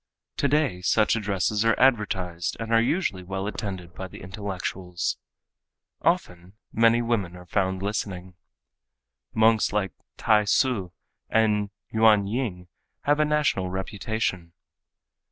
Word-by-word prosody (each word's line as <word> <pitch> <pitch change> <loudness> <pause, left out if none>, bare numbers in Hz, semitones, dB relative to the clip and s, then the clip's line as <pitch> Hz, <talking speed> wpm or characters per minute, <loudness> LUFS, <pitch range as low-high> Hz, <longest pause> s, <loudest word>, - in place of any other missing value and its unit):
Today 140 -10 +1
such 110 +4 +3
addresses 105 0 0
are 115 0 +2
advertised 95 -9 +1
and 115 0 -3
are 115 - +6
usually 120 - 0
well 95 +1 -4
attended 95 -5 -5
by 95 +2 -6
the - - -12
intellectuals. 90 -2 -4 0.8
Often 90 +1 -1 0.2
many 115 +1 +4
women 105 -7 -1
are 90 0 -11
found 95 0 -1
listening. 95 -3 -3 1.0
Monks 110 0 +4
like 100 -2 0 0.3
T'ai 105 -2 +3
Hsü 105 -4 +1 0.4
and 105 -2 +2 0.2
Yuan 110 -2 +5
Ying 100 -5 -3 0.3
have 145 +1 +2
a 150 - +4
national 150 -11 +1
reputation. 95 -2 -3
100 Hz, 120 wpm, -26 LUFS, 95-115 Hz, 1.0 s, are